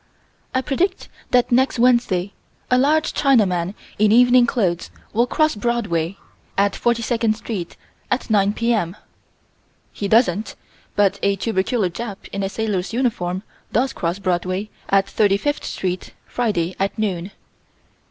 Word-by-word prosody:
I 260 - +3
predict 350 +8 -1 0.2
that 250 -1 +3
next 260 +2 +3
Wednesday, 230 -6 +2 0.4
a 250 - +5
large 305 +4 +2
Chinaman, 195 -9 +2 0.2
in 210 0 +4
evening 245 +1 +6
clothes, 185 -8 0 0.2
will 235 +3 +2
cross 310 +4 +2
Broadway, 205 -6 -1 0.4
at 200 0 +3
42nd 230 -1 +1
Street, 210 -6 -6 0.3
at 255 - -1
9 205 -2 +3
P.M. 220 -7 0 1.0
He 200 - -3
doesn't, 215 -2 +2 0.4
but 200 -1 +2
a 200 0 +2
tubercular 195 0 0
Jap 205 0 -7
in 200 - -3
a 195 - -1
sailor's 210 -2 -2
uniform 195 -7 -1 0.3
does 260 +4 +1
cross 170 +2 -2
Broadway, 185 +1 -2 0.2
at 195 0 +4
35th 205 +9 +1
Street, 185 -1 -4
Friday, 190 -8 -1
at 195 +1 -1
noon. 190 -4 -2
210 Hz, 130 wpm, -21 LUFS, 190-240 Hz, 1.0 s, evening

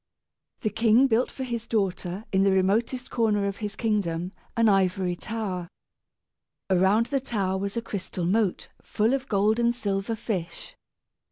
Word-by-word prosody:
The 215 - 0
king 225 +4 +4
built 245 -1 +2
for 265 - -6
his 235 -2 -4
daughter, 195 -2 -1
in 190 - +3
the 195 - +4
remotest 220 +7 +1
corner 215 -4 +1
of 200 -1 -2
his 205 -2 -5
kingdom, 185 -6 -1 0.3
an 230 -1 +4
ivory 190 -2 +2
tower. 195 -4 -4 1.0
Around 190 +5 +4
the 275 +2 0
tower 195 -7 -1
was 200 +3 -3
a 230 - -1
crystal 185 -4 -4
moat 200 +1 0
full 220 +4 +1
of 270 -1 -2
gold 210 +2 +2
and 235 0 +2
silver 200 -1 -2
fish. 195 -6 -5
210 Hz, 155 wpm, -26 LUFS, 190-230 Hz, 1.0 s, king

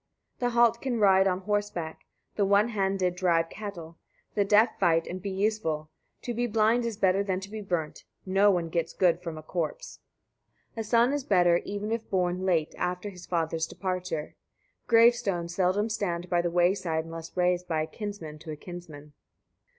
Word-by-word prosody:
71. 245 - +1
The - - -7
halt 235 -1 +4
can 250 -4 -1
ride 190 -2 +5
on 185 0 0
horseback, 205 -5 -3 0.3
the 205 - +1
one 200 +3 +4
handed 195 -4 0
drive 170 -3 +1
cattle; 170 -6 -8 0.3
the 205 - +2
deaf 210 +4 +3
fight 165 -1 +3
and 185 +1 -6
be 200 - -4
useful: 190 -6 -1 0.3
to 240 - -3
be 240 +1 0
blind 225 +2 +2
is 230 -3 -3
better 195 -1 +3
than 190 -2 -1
to 195 +1 -9
be 215 0 -5
burnt 175 -6 -3 0.2
no 195 +2 +4
one 175 -4 +1
gets 170 0 -2
good 175 -2 +2
from 165 -3 -6
a 155 - -9
corpse. 160 -1 -4 0.7
72. 230 - -8
A - - -1
son 235 +4 +3
is 290 -2 -1
better, 175 -6 +4
even 205 +2 -4
if 230 -1 -3
born 185 0 0
late, 165 -4 +1
after 180 +3 -2
his 180 -2 -12
father's 165 -2 -1
departure. 185 -5 -4 0.5
Gravestones 230 -7 +3
seldom 190 +4 +1
stand 180 -5 -3
by 175 -1 +3
the 175 - -1
way 175 +2 +3
side 165 -5 -2
unless 165 +1 -9
raised 180 0 +1
by 160 -2 0
a - - -2
kinsman 165 -4 -7
to 160 - -11
a 155 - -4
kinsman. 155 -3 -10
185 Hz, 190 wpm, -28 LUFS, 170-205 Hz, 0.7 s, ride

